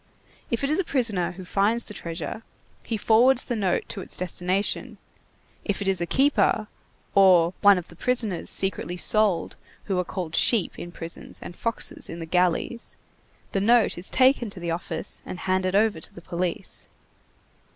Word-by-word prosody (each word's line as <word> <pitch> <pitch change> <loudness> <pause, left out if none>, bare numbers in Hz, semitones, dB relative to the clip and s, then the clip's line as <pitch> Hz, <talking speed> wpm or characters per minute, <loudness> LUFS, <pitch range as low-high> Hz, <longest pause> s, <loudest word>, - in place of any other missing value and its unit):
If 235 +3 -1
it 275 - +1
is 310 - +2
a - - +2
prisoner 225 - 0
who 185 +1 -9
finds 205 +6 +1
the 210 - -10
treasure, 165 +2 -5 0.4
he 225 - -3
forwards 240 +5 +4
the 240 - -3
note 195 -5 0
to 195 - -5
its - - -3
destination; 185 +2 -2 0.7
if 205 - -2
it 200 - -3
is 190 -2 +1
a 170 - -1
keeper, 270 -4 +2 0.5
or 180 -3 +6
one 200 -1 +7
of 180 - -5
the 170 - -15
prisoners 225 -4 -1
secretly 190 -2 -1
sold 210 -1 +1 0.3
who 190 -3 -1
are - - +1
called 175 -3 -5
sheep 215 +2 +2
in 175 - -7
prisons 170 -1 -8
and 175 - -8
foxes 230 +4 -1
in 165 - -6
the 165 - -6
galleys, 180 +7 0 0.6
the 195 - 0
note 235 +2 +4
is 175 - -1
taken 255 -3 +3
to 195 - -9
the 170 -1 -3
office 165 -1 -3
and 180 - -7
handed 185 0 0
over 210 -4 +3
to - - -2
the - - -9
police. 175 0 -4
195 Hz, 175 wpm, -25 LUFS, 175-225 Hz, 0.7 s, one